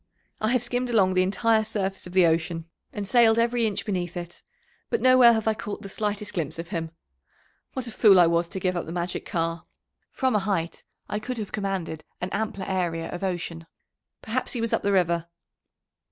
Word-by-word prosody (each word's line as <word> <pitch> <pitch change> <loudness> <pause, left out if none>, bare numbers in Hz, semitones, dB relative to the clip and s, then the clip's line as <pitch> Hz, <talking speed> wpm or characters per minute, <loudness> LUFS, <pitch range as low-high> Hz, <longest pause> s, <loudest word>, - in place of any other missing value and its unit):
"I 215 - 0
have 250 -2 +2
skimmed 245 +1 -1
along 195 -5 +3
the 185 - +3
entire 220 +4 +2
surface 195 -3 -3
of 180 - -11
the 185 -2 +6
ocean, 165 0 0 0.3
and 205 -1 -5
sailed 230 -1 +5
every 235 0 +2
inch 205 - -3
beneath 180 -5 -2
it, 175 0 -7 0.5
but 460 - +1
nowhere 255 -2 +7
have 220 -1 -1
I 220 - +4
caught 210 0 -6
the 195 - -7
slightest 210 0 -3
glimpse 165 -7 -3
of 165 +1 -6
him. 165 -1 -3 0.8
What 260 -2 -3
a 235 - -6
fool 205 -3 +6
I 175 - +8
was 170 +1 +2
to 190 - -4
give 185 0 0
up 175 - -3
the - - -5
magic 175 +1 -3
car! 165 0 -2 0.4
From 260 -3 0
a - - +4
height 190 -4 -2 0.2
I 210 - -2
could 250 +3 -5
have 215 -3 -5
commanded 190 -6 -3 0.2
an 180 - -3
ampler 210 -3 -2
area 175 -4 -1
of 175 - -6
ocean. 170 -3 -3 0.6
Perhaps 245 +3 -2
he 245 - -3
was 230 0 -1
up - - +2
the 200 - +1
river." 170 -3 +2
195 Hz, 205 wpm, -26 LUFS, 175-220 Hz, 0.8 s, I